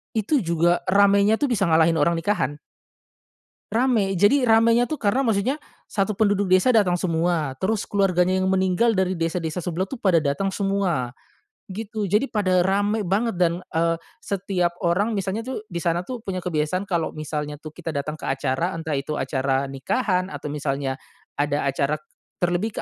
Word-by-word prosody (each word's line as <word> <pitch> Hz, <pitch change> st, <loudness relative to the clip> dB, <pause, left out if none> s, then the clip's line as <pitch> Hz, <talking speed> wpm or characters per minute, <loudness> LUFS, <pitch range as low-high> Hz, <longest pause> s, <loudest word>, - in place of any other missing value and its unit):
itu 225 Hz, +7 st, +2 dB
juga 170 Hz, +1 st, +2 dB
ramainya 200 Hz, +2 st, +4 dB
tuh 290 Hz, -, +1 dB
bisa 200 Hz, -5 st, +1 dB
ngalahin 160 Hz, 0 st, +4 dB
orang 170 Hz, +3 st, +3 dB
nikahan. 170 Hz, -5 st, 0 dB, 1.2 s
Ramai 225 Hz, -5 st, +2 dB
jadi 245 Hz, +8 st, +4 dB
ramainya 230 Hz, +2 st, +4 dB
tuh 310 Hz, -, -2 dB
karena 225 Hz, +3 st, +1 dB
maksudnya, 245 Hz, +4 st, 0 dB, 0.2 s
satu 200 Hz, 0 st, -1 dB
penduduk 205 Hz, -2 st, +2 dB
desa 185 Hz, +6 st, +5 dB
dateng 195 Hz, -6 st, +3 dB
semua 165 Hz, -4 st, 0 dB
terus 210 Hz, +2 st, 0 dB
keluarganya 185 Hz, -2 st, +2 dB
yang 190 Hz, -, +1 dB
meninggal 190 Hz, +4 st, +2 dB
dari 185 Hz, -1 st, +1 dB
desa-desa 165 Hz, 0 st, -2 dB
sebelah 175 Hz, +2 st, -2 dB
tuh 230 Hz, +5 st, -8 dB
pada 190 Hz, -4 st, +3 dB
dateng 140 Hz, +8 st, 0 dB
semua, 195 Hz, -, -1 dB, 0.6 s
gitu 210 Hz, +1 st, -4 dB
jadi 210 Hz, +7 st, +3 dB
pada 185 Hz, -7 st, +1 dB
rame 205 Hz, +2 st, +1 dB
banget 205 Hz, +2 st, 0 dB
dan, 170 Hz, -2 st, +3 dB, 0.2 s
eee, 165 Hz, 0 st, +2 dB, 0.3 s
setiap 185 Hz, -3 st, -1 dB
orang 195 Hz, +6 st, +1 dB
misalnya 200 Hz, +3 st, -2 dB
tuh 260 Hz, -4 st, -4 dB
di 170 Hz, -, -5 dB
sana 170 Hz, 0 st, 0 dB
tuh 250 Hz, +8 st, -6 dB
punya 185 Hz, -2 st, -3 dB
kebiasaan 170 Hz, +1 st, -1 dB
kalo 170 Hz, -3 st, -1 dB
misalnya 150 Hz, -1 st, -5 dB
tuh 155 Hz, -, -7 dB
kita 165 Hz, +1 st, -7 dB
datang 150 Hz, +2 st, -3 dB
ke -, -, -8 dB
acara 135 Hz, +6 st, -1 dB
entah 160 Hz, -3 st, -3 dB
itu 140 Hz, +2 st, -3 dB
acara 135 Hz, 0 st, -1 dB
nikahan 185 Hz, -, -1 dB
atau 150 Hz, -, -6 dB
misalnya, 140 Hz, -2 st, -2 dB, 0.4 s
ada 145 Hz, -1 st, 0 dB
acara 140 Hz, +1 st, 0 dB, 0.5 s
terlebih 175 Hz, +5 st, -1 dB
185 Hz, 165 wpm, -23 LUFS, 160-205 Hz, 1.2 s, desa